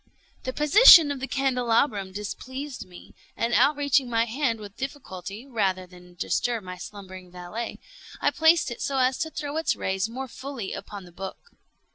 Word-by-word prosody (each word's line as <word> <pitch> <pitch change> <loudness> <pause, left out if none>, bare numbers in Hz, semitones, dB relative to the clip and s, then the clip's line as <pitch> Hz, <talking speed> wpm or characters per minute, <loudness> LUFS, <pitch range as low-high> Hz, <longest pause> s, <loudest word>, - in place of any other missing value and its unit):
The 255 - -1
position 300 - +8
of 280 - -4
the 270 - -4
candelabrum 245 -7 +1
displeased 260 +6 -6
me, 180 -1 -14 0.2
and 230 +1 -1
outreaching 285 -3 +3
my 230 -1 +2
hand 235 -1 -1
with 205 -2 -10
difficulty, 215 -6 -7
rather 195 -8 -1
than 180 -1 -17
disturb 230 +5 -1
my 185 0 -8
slumbering 185 -2 -10
valet, 180 +6 -6 0.4
I - - +2
placed 320 -3 +3
it 235 - -7
so 275 - -1
as 255 0 +2
to 320 - -1
throw 300 -1 -5
its 320 - +1
rays 190 +3 -2
more 260 +3 -5
fully 255 -3 -6
upon 200 -2 -8
the 175 - -14
book. 190 +2 -7
235 Hz, 165 wpm, -26 LUFS, 190-275 Hz, 0.4 s, position